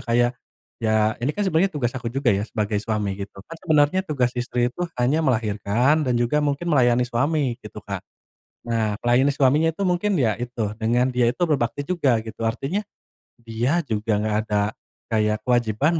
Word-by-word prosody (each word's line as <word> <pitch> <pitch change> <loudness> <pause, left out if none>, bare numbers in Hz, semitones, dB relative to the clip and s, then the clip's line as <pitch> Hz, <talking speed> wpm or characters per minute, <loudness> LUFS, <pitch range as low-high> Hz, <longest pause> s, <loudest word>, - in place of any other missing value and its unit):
kayak, 120 +1 +2 0.5
ya 110 -1 +2
ini 125 - 0
kan 205 - 0
sebenarnya 185 0 +2
tugas 125 -6 -1
aku 120 -2 -3
juga 125 -1 +1
ya 100 +1 0
sebagai 105 -1 -1
suami 105 -2 -2
gitu. 100 0 -7
Kan 165 - -10
sebenarnya 155 0 +3
tugas 125 -5 +1
istri 120 0 -1
itu 175 - -11 0.2
hanya 130 +6 +2
melahirkan 120 +2 +1
dan 125 - +2
juga 120 +5 +1
mungkin 145 +2 -1
melayani 125 -3 +4
suami 130 +1 0
gitu, - - -10
Kak. - - -4 0.7
Nah, 110 -2 0
melayani 125 +4 +4
suaminya 145 +4 +3
itu, 200 - -2
mungkin 190 +2 +1
ya 115 - +1
itu, 120 -3 -3
dengan 120 +3 +2
dia 125 -1 +2
itu 175 - -2
berbakti 145 -5 0
juga 140 -9 +1
gitu. 115 0 -4
Artinya, 135 - -2 0.6
dia 120 +9 0
juga 110 -4 -1
enggak 105 0 0
ada 105 -1 +1 0.5
kayak 105 -1 +1
kewajiban 125 +6 +1
120 Hz, 175 wpm, -23 LUFS, 110-145 Hz, 0.7 s, melayani